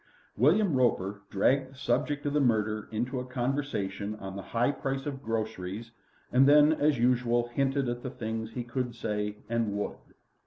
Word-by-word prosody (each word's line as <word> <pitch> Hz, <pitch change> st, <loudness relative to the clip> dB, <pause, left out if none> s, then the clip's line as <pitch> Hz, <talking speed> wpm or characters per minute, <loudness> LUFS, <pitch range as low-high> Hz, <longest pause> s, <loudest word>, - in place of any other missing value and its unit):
William 170 Hz, -, +4 dB
Roper 105 Hz, -6 st, +1 dB
dragged 130 Hz, +7 st, +2 dB
the 135 Hz, -, -17 dB
subject 145 Hz, +1 st, 0 dB
of 145 Hz, -, 0 dB
the 150 Hz, -, +3 dB
murder 110 Hz, -5 st, +1 dB
into 125 Hz, +4 st, -2 dB
a -, -, -3 dB
conversation 120 Hz, -6 st, -2 dB
on 95 Hz, -2 st, -7 dB
the 100 Hz, -, -5 dB
high 120 Hz, +6 st, +1 dB
price 135 Hz, -1 st, -3 dB
of 140 Hz, -2 st, -4 dB
groceries, 110 Hz, -1 st, -4 dB, 0.4 s
and 130 Hz, +2 st, +5 dB
then, 150 Hz, +1 st, +7 dB
as 150 Hz, -2 st, +2 dB
usual, 120 Hz, 0 st, +2 dB
hinted 135 Hz, +2 st, 0 dB
at 120 Hz, 0 st, -2 dB
the 130 Hz, -, -4 dB
things 115 Hz, -3 st, -4 dB
he 125 Hz, -, -3 dB
could 120 Hz, 0 st, -3 dB
say 105 Hz, -2 st, -2 dB
and 115 Hz, -1 st, 0 dB
he 100 Hz, -, -2 dB
would. 105 Hz, 0 st, -3 dB
120 Hz, 180 wpm, -29 LUFS, 110-135 Hz, 0.4 s, then